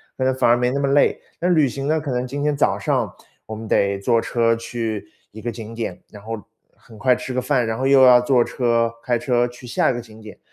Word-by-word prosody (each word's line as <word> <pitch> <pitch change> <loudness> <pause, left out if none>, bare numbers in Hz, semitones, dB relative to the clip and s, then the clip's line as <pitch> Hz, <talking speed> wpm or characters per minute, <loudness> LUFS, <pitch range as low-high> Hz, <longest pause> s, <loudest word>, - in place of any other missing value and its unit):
可 130 - -3
能 130 - +3
反 130 - +2
而 120 - +5
没 125 0 +1
那 135 +2 -1
么 140 -1 0
累。 140 +1 +3 0.2
那 175 - 0
旅 155 -5 +4
行 135 +2 -4
呢， 155 +1 +2
可 150 -3 -5
能 125 0 -2
今 140 +3 -4
天 150 0 +1
早 - - +1
上 - - -1 0.4
我 110 - -6
们 110 +1 -8
得 100 -1 +1
坐 115 +4 +1
车 115 -1 +1
去 115 -4 -4 0.2
一 110 - -11
个 120 +2 -3
景 115 0 -9
点， 115 -6 -5
然 105 - -12
后 115 +1 -5 0.4
很 110 -2 -17
快 125 +3 +3
吃 130 - -6
个 125 - 0
饭， 125 -2 +1
然 110 0 -2
后 130 +3 -1
又 135 -1 +6
要 125 -1 +7
坐 125 -1 +3
车 115 -2 0
开 120 -2 +1
车 120 0 +1
去 125 +1 -13
下 120 - +1
一 - - 0
个 - - -3
景 110 -2 -13
点， 110 -1 -12
120 Hz, 280 characters per minute, -21 LUFS, 115-130 Hz, 0.4 s, 要